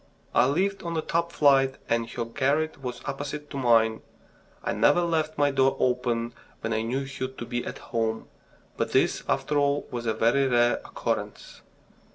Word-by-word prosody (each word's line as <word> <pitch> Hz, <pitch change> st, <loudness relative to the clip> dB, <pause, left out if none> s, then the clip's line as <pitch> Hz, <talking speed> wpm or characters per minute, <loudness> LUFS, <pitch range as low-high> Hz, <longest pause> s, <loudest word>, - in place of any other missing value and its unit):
I -, -, +5 dB
lived 190 Hz, +7 st, 0 dB
on 170 Hz, -1 st, -4 dB
the 160 Hz, -, -1 dB
top 170 Hz, 0 st, -1 dB
flight 135 Hz, -4 st, +4 dB
and 115 Hz, 0 st, 0 dB
her 120 Hz, -, -3 dB
garret 140 Hz, +5 st, 0 dB
was 125 Hz, -2 st, -6 dB
opposite 145 Hz, +1 st, -5 dB
to 140 Hz, -, -5 dB
mine. 115 Hz, -3 st, +3 dB, 0.6 s
I -, -, -1 dB
never 145 Hz, +11 st, +4 dB
left 160 Hz, -2 st, 0 dB
my 145 Hz, -1 st, +3 dB
door 135 Hz, -1 st, +2 dB
open 120 Hz, -2 st, 0 dB, 0.3 s
when 110 Hz, -, -2 dB
I 110 Hz, -, 0 dB
knew 120 Hz, +4 st, -1 dB
her 135 Hz, -1 st, -4 dB
to 130 Hz, -2 st, -8 dB
be 120 Hz, +1 st, -3 dB
at -, -, -6 dB
home. 110 Hz, -1 st, -2 dB, 0.5 s
But -, -, -2 dB
this, -, -, +2 dB
after 150 Hz, -1 st, +1 dB
all, 140 Hz, 0 st, +1 dB
was 120 Hz, -1 st, -4 dB
a 110 Hz, -, +1 dB
very 135 Hz, +4 st, +3 dB
rare 120 Hz, -1 st, +3 dB
occurrence. -, -, -4 dB
135 Hz, 180 wpm, -26 LUFS, 120-145 Hz, 0.6 s, I